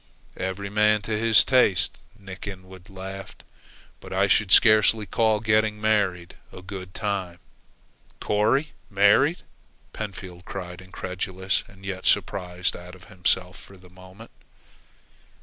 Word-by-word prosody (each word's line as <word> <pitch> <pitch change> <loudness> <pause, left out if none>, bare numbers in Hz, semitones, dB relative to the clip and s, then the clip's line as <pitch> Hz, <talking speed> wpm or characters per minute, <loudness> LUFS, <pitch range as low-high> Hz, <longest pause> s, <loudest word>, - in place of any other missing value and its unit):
"Every 95 +2 -4
man 105 0 +3
to 110 +1 -2
his 110 -1 +5
taste," 100 -9 +2 0.2
Nick 95 -1 -10
Inwood 95 0 -10
laughed; 95 0 -9 0.6
"but - - -12
I 95 +1 +2
should 100 0 +2
scarcely 110 -1 +5
call 110 0 +1
getting 110 0 +1
married 100 -5 0
a 90 - -11
good 95 -1 -9
time." 95 -4 -3 0.8
"Corry 110 +9 +1 0.2
married!" 105 - +3 0.5
Pentfield 95 -4 -8
cried, 90 -1 -7
incredulous 95 +1 -3
and 95 -1 -16
yet 95 -1 -4
surprised 90 -1 0
out 90 +1 -11
of 90 - -17
himself 90 0 -1
for 95 - -16
the 90 -1 -18
moment. 95 +4 -15
95 Hz, 125 wpm, -24 LUFS, 95-105 Hz, 0.8 s, his